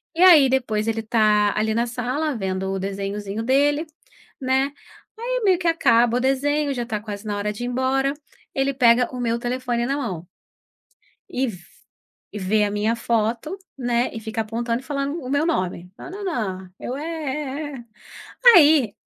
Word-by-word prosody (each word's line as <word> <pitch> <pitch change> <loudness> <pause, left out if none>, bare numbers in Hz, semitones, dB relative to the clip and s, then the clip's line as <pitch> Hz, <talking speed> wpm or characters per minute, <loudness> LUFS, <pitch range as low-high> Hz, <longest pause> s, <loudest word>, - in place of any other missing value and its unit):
E 335 - -1
aí, 335 -7 +8
depois, 225 -5 0
ele 225 0 0
tá 210 -2 +2
ali 215 +1 +1
na 235 +2 0
sala 255 +5 -2
vendo 190 -2 -2
o 195 - -2
desenhozinho 200 +2 -4
dele, 290 +6 +2 0.5
né, 265 +1 +1 0.5
aí - - -2
meio 380 -3 +4
que 345 -1 -2
acaba 240 -8 +3
o - - +1
desenho, 285 +3 +1
já 245 -3 -2
tá 220 -3 -3
quase 210 0 -7
na 210 -1 -2
hora 205 +1 -2
de 210 +3 -7
ir - - -2
embora, 260 +2 0 0.4
ele 270 0 0
pega 245 -1 +4
o 250 - -6
meu 235 -1 0
telefone 245 0 -2
na 275 - 0
mão. 185 - -4 1.0
E 260 +1 -1
v 210 -6 -6 0.8
e 210 - -5
vê 210 +3 +2
a 205 - -2
minha 210 +3 0
foto, 235 - -1 0.2
né, 245 -1 0
e 225 - -5
fica 220 0 -3
apontando 230 +2 -2
e - - -19
falando 280 +2 -3
o 255 - -7
meu 285 +3 +1
nome: 180 - -2
"Na - - -9
na 400 +2 -7
na". 190 - -3
Eu: 250 - -4
"É, 290 - -5
é, 300 -2 -4
é". 240 - -13 0.7
Aí, 290 - +5
245 Hz, 180 wpm, -22 LUFS, 215-280 Hz, 1.0 s, aí